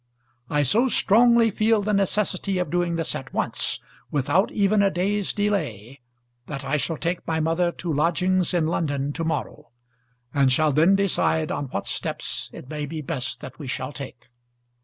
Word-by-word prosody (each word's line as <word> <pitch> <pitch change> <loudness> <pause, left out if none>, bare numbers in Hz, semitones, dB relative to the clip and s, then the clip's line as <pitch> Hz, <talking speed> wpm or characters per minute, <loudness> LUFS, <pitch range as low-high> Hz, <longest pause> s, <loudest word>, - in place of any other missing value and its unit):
I 150 0 +2
so 225 - +3
strongly 235 +1 +4
feel 215 +1 +2
the 210 +1 0
necessity 195 -1 0
of 180 - -2
doing 175 -1 0
this 165 -1 -1
at 135 - -6
once, - - -1 0.3
without 145 +7 +1
even 205 0 +2
a 200 - +4
day's 195 +2 -1
delay, 145 - -2 0.5
that 140 -2 -6
I 145 +2 +1
shall 160 +2 -2
take 170 +3 -3
my 160 -1 0
mother 165 +2 +1
to 170 -2 -3
lodgings 175 +4 +2
in 175 -3 +1
London 145 -3 -1
to 165 - -3
morrow, 150 -11 -3 0.6
and 140 -2 +3
shall 155 +4 +3
then 165 +7 +4
decide 170 -5 +1
on 145 - -2
what 100 -7 -4
steps - - -3
it - - -11
may 150 0 -4
be 155 +1 -5
best 130 -4 -3
that 130 0 -10
we 140 - -7
shall 130 +2 -3
take. 130 -3 -9
165 Hz, 175 wpm, -24 LUFS, 145-195 Hz, 0.6 s, strongly